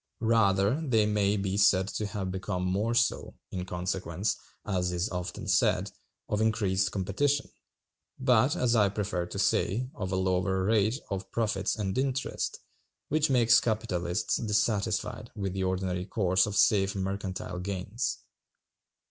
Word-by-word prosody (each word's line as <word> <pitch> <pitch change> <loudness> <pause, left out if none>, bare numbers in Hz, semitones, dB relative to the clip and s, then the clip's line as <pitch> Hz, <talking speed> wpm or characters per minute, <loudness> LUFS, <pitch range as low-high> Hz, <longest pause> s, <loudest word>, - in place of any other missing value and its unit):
Rather 110 +3 +3
they 115 -7 +3
may 105 -1 +1
be 95 -1 -1
said 95 -2 +4
to 105 0 -3
have 100 -3 -4
become 95 -1 -3
more 105 +6 0
so, 115 0 +1 0.2
in 90 -1 -3
consequence, 90 +1 -2 0.3
as 90 -3 0
is 90 +3 -1
often 90 -1 -5
said, - - +2 0.4
of 105 0 -1
increased 100 -4 +1
competition, 135 +9 0 0.7
but, 130 +3 +3
as 125 -7 +2
I 105 -3 +4
prefer 100 -3 -2
to - - -7
say, 125 +6 +1
of 95 -3 -4
a - - 0
lower 95 0 +1
rate 110 +4 +2
of 95 -1 -4
profits 110 -4 0
and 100 -3 -2
interest, 135 0 -2 0.5
which 155 0 +2
makes 115 -3 +5
capitalists 90 -6 -1
dissatisfied 105 -1 -1
with 95 -3 -3
the 95 0 -2
ordinary 95 0 -2
course 95 -2 +2
of 105 - -4
safe 100 -2 +3
mercantile 95 -2 -4
gains. 100 +5 -3
100 Hz, 140 wpm, -29 LUFS, 95-110 Hz, 0.7 s, makes